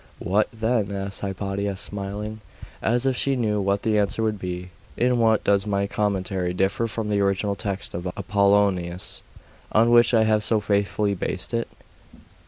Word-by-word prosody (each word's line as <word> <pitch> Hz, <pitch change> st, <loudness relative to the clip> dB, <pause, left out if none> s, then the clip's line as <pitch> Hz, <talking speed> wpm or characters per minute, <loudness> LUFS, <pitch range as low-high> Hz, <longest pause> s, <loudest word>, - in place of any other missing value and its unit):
'What 100 Hz, +4 st, +1 dB
then?' 110 Hz, -2 st, 0 dB
asked 100 Hz, 0 st, -4 dB
Hypatia, 100 Hz, 0 st, -3 dB
smiling, 105 Hz, +2 st, -5 dB, 0.4 s
as 120 Hz, +3 st, +1 dB
if 135 Hz, -1 st, +2 dB
she 135 Hz, +2 st, +1 dB
knew 105 Hz, -4 st, 0 dB
what 100 Hz, +1 st, 0 dB
the 110 Hz, -1 st, +2 dB
answer 105 Hz, +2 st, 0 dB
would 110 Hz, -2 st, -1 dB
be. 90 Hz, 0 st, -5 dB, 0.3 s
'In 125 Hz, 0 st, +2 dB
what 110 Hz, -1 st, +3 dB
does 100 Hz, 0 st, +2 dB
my 100 Hz, -1 st, +1 dB
commentary 95 Hz, -5 st, -1 dB
differ 95 Hz, +5 st, +1 dB
from 110 Hz, -1 st, -4 dB
the 105 Hz, -1 st, +1 dB
original 100 Hz, +1 st, +1 dB
text 100 Hz, -1 st, -4 dB
of 85 Hz, +2 st, -4 dB
Apollonius, 100 Hz, -2 st, +1 dB, 0.5 s
on 115 Hz, +2 st, +4 dB
which 120 Hz, 0 st, +6 dB
I 110 Hz, -, +5 dB
have 110 Hz, -1 st, +2 dB
so 110 Hz, 0 st, +2 dB
faithfully 100 Hz, 0 st, 0 dB
based 95 Hz, +2 st, -3 dB
it? 115 Hz, 0 st, 0 dB
100 Hz, 165 wpm, -24 LUFS, 100-110 Hz, 0.5 s, which